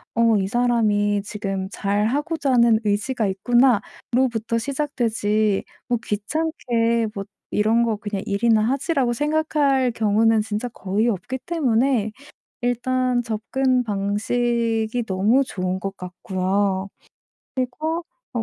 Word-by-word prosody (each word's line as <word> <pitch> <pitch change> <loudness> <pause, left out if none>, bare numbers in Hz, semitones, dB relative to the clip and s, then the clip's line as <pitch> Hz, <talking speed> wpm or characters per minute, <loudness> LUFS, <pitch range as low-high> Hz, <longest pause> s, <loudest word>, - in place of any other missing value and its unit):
'어 230 -2 +4
이 190 -1 0
사람이 210 -3 +1
지금 195 -2 -4
잘하고자 270 +9 0
하는 235 -2 +5
의지가 210 +2 0
있구나.'로부터 235 +2 +1
시작되지 225 -6 0 0.2
뭐 240 - +2
'귀찮게 235 -1 0
뭐 200 -1 -5 0.2
이런 220 +3 +2
거 225 -3 0
그냥 205 -2 -4
일이나 215 +2 +2
하지.'라고 265 +1 +1
생각할 295 -2 +1
경우는 225 0 +3
진짜 215 +3 -3
거의 215 +1 -1
없기 230 +6 -3
때문에 250 -8 +1 0.5
일단 245 0 0
접근 250 +3 0
방식이 225 +3 0
너무 205 +8 +3
좋은 185 -4 -3
것 195 +1 -5
같고요. 190 +2 -1 1.4
그리고 240 - -1
225 Hz, 245 characters per minute, -22 LUFS, 205-250 Hz, 1.4 s, 하는